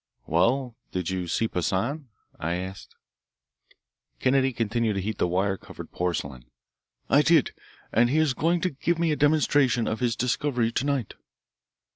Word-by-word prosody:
"Well, 120 - +1 0.2
did 90 -1 -2
you 90 -2 -3
see 115 +6 0
Poissan?" 115 - -2 0.3
I 85 +2 -1
asked. 95 +2 -7 1.2
Kennedy 135 0 +2
continued 115 -1 0
to 100 - -2
heat 105 +2 -4
the - - +2
wire 95 +2 0
covered - - -11
porcelain. 75 -8 -3 0.6
"I 140 - +5
did, 160 -2 +4 0.4
and 120 +1 +3
he 145 - +1
is 155 -4 +3
going 170 +5 +1
to 185 - 0
give 160 +4 -1
me 165 -1 +1
a - - +2
demonstration 145 -5 +3
of 110 - -2
his 120 -3 0
discovery 125 -1 0
to 125 - -1
night." 140 -6 -1
120 Hz, 155 wpm, -26 LUFS, 95-140 Hz, 1.2 s, I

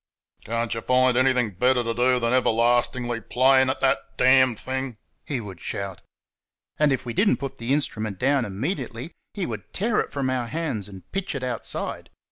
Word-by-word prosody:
"Can't 115 +1 -1
y' 115 - -3
find 130 0 +3
anything 125 -3 +3
better 125 +6 +2
t' 115 0 -1
do 125 +2 +3
than 115 0 0
everlastingly 120 0 +2
playing 130 +3 +4
at 130 - -2
that 135 - +3 0.2
damn 130 -1 +5
thing?" 130 0 -4 0.3
he 140 -4 -1
would 100 -6 -8
shout. 100 -3 -4 0.8
And 150 -1 +4
if 135 - -1
we 120 - -4
did 200 - +3
n't - - +1
put 135 -2 -6
the 115 +2 -2
instrument 110 -8 -1
down 135 +4 +2
immediately 120 - -4 0.2
he 195 -3 -2
would 110 -5 -7
tear 215 +3 +1
it - - -2
from 135 -2 -1
our 125 -2 -1
hands 140 - -3
and 95 -3 -11
pitch 195 -5 -3
it 135 - -4
outside. 125 -4 -3
125 Hz, 185 wpm, -24 LUFS, 115-135 Hz, 0.8 s, damn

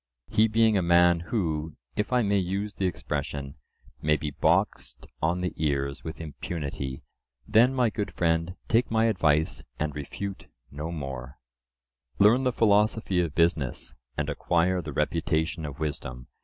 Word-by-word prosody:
—he 110 +1 +4
being 110 0 +3
a 95 - +3
man 85 0 +5
who, 80 -7 -1 0.2
if 105 - -1
I 125 -1 +3
may 100 -1 +2
use 100 +3 -2
the 95 - 0
expression, 70 -5 -4 0.5
may 75 0 +3
be 75 +1 -4
boxed - - 0 0.2
on 85 +3 +1
the 90 - -2
ears 70 -3 -1
with 80 - -6
impunity. 70 -4 -5 0.4
Then, 125 +4 +5
my 125 -4 +2
good 105 -2 -3
friend, 85 +1 0
take 115 +2 +2
my 115 0 +3
advice, 80 -8 +2
and 75 -1 -2
refute 95 +7 -6 0.2
no 75 +4 -5
more: 65 -5 -6 0.8
"Learn 115 +6 +5
the 125 - +3
philosophy 105 -3 +2
of 85 -4 -3
business, 80 -7 +1 0.2
and 75 - -1
acquire 90 +4 +1
the 75 - -6
reputation 80 +3 0
of 70 - -8
wisdom. 65 -5 -4
85 Hz, 150 wpm, -27 LUFS, 75-100 Hz, 0.8 s, man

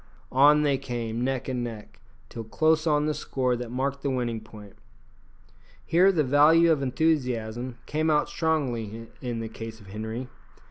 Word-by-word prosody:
On 145 +3 +5
they 140 -3 +1
came 115 -1 -3
neck 130 0 -2
and 125 -2 -2
neck, 110 -3 -8 0.3
till 115 - -7
close 155 +7 +1
on 150 -1 +2
the 155 - 0
score 130 -4 -1
that 120 -1 -6
marked 135 +3 -2
the 140 - -1
winning 120 -4 -2
point. 105 -2 -13 1.1
Here 185 +4 +5
the 160 -5 +1
value 155 +5 +5
of 150 -3 +2
enthusiasm 125 -5 -1
came 155 +1 0
out 150 -1 +2
strongly 120 -9 -2
in 120 -3 -3
the 115 - -4
case 110 0 -8
of 100 -3 -15
Henri. 110 +5 -5
130 Hz, 165 wpm, -26 LUFS, 115-150 Hz, 1.1 s, On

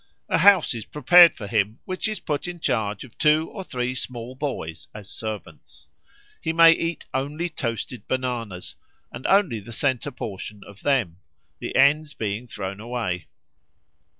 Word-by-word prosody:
A - - +2
house 195 -8 +6
is 115 -3 -6
prepared 175 +2 +7
for 105 - -6
him 105 +1 0
which 185 +2 -2
is 215 -1 -3
put 150 +1 -3
in 175 -1 -6
charge 105 -8 -1
of 125 - -14
two 155 0 +3
or 195 - -6
three 125 -6 -2
small 125 -1 -5
boys 130 - -5
as 105 -2 -9
servants. 110 -4 -8 0.5
He 160 - -1
may 165 0 +8
eat 165 -1 -1
only 145 +6 -2
toasted 120 -5 -4
bananas, 120 -8 -3 0.4
and - - -5
only 190 - +3
the 115 +3 -11
centre 130 +3 0
portion 105 -5 -7
of 100 0 -14
them 120 -12 +1 0.4
the - - -5
ends 150 +3 +4
being 110 +3 -3
thrown 100 -3 -5
away. 110 -6 -3
125 Hz, 155 wpm, -24 LUFS, 110-155 Hz, 0.5 s, may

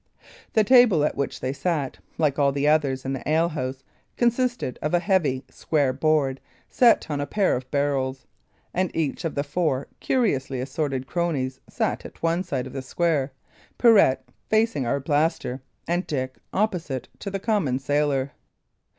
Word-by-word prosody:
The 220 - +4
table 225 - +6
at - - -1
which 140 - -3
they 130 +1 -1
sat, 145 -3 -2 0.2
like 150 -3 +1
all 140 -1 +4
the 140 +1 0
others 140 -4 +2
in 135 - -1
the 135 - -4
alehouse, 150 -5 0 0.3
consisted 240 - 0
of 150 +3 +1
a - - +4
heavy, 165 -9 +1
square 145 -5 0
board, 140 -2 +1 0.3
set 235 -9 +4
on 145 -1 -1
a 145 - -3
pair 205 -3 +2
of 130 +1 -6
barrels; 135 -2 -1 0.5
and 185 0 +1
each 160 +1 -1
of 165 - -2
the 140 - 0
four 145 -3 -1
curiously 140 - 0
assorted 135 0 -2
cronies 140 -7 -2
sat - - -1
at - - -12
one 165 +2 +2
side 170 -8 -3
of - - -9
the 135 - -4
square, 145 0 0 0.5
Pirret 205 - +5 0.3
facing 220 - +2
Arblaster, 140 0 0 0.3
and 175 +2 0
Dick 130 -3 -3
opposite 175 - -1
to 200 - -5
the 195 - -2
common 190 - +1
sailor. 140 0 0
145 Hz, 160 wpm, -24 LUFS, 135-175 Hz, 0.5 s, table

